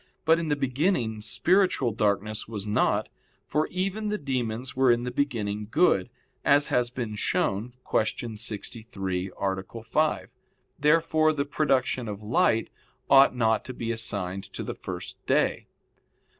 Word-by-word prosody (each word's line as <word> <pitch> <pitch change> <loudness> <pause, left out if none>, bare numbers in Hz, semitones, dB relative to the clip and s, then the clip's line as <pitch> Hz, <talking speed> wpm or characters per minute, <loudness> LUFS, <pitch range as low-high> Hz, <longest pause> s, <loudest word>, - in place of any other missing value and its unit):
But 165 +1 +5
in 165 - -3
the 145 - +2
beginning 130 - 0
spiritual 170 - +2
darkness 105 0 0
was 105 -3 -5
not, 105 0 +1 0.4
for 155 +1 0
even 195 +4 -2
the 210 - 0
demons 125 - -3
were 130 -1 +4
in 120 0 +1
the 125 - -3
beginning 105 -6 -2
good, 100 - +3 0.3
as 145 +1 +4
has 125 -1 +2
been 120 -3 -4
shown 105 +2 -1
(Q. 110 +1 -1
63, 105 -4 -4
A. 95 +3 -3
5). 115 -6 0 0.5
Therefore 155 +1 +3
the 140 -2 -1
production 135 -4 0
of 105 0 -6
light 110 +1 +2 0.4
ought 135 -2 +7
not 110 -2 +2
to 130 - -7
be 115 -1 -3
assigned 100 -4 -2
to - - -4
the - - -4
first - - -8
day. - - +1
120 Hz, 145 wpm, -27 LUFS, 105-145 Hz, 0.5 s, ought